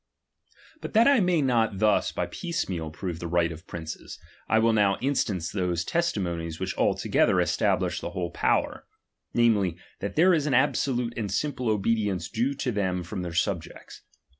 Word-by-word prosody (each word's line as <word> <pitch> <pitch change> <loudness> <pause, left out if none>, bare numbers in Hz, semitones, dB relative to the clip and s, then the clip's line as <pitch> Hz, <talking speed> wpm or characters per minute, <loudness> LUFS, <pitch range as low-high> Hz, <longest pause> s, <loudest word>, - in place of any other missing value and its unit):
But - - -7
that 230 +3 +6
I 280 -3 +5
may 180 -5 +2
not 115 -6 +1
thus 105 +1 +2
by - - -2
piecemeal 95 - -3
prove 85 +1 -5
St - - -12
the 85 - -4
right 85 0 +1
of 85 +3 -10
princes, 80 -1 -7 0.3
I 110 - +4
will 115 0 +4
now 100 -2 +3
instance 105 - -1
those 90 -3 -1
^.testimonies 85 - -2
which - - -3
altogether - - +2
establish - - +1
the - - -4
whole 90 -1 -4
™ - - -26
power; - - 0 0.5
namely, 105 -7 +3 0.2
that 100 - -4
there 180 +4 +5
is 155 -3 +1
an 135 - +2
absolute 125 -2 +1
and 105 -5 -3
simple 130 +2 -1
obedience 105 -4 0
due 125 +5 -1
to 135 -2 -2
them 95 -4 -1
from 95 +2 -5
their 85 -2 -5
subjects. 85 -2 -3
105 Hz, 175 wpm, -26 LUFS, 85-125 Hz, 0.5 s, that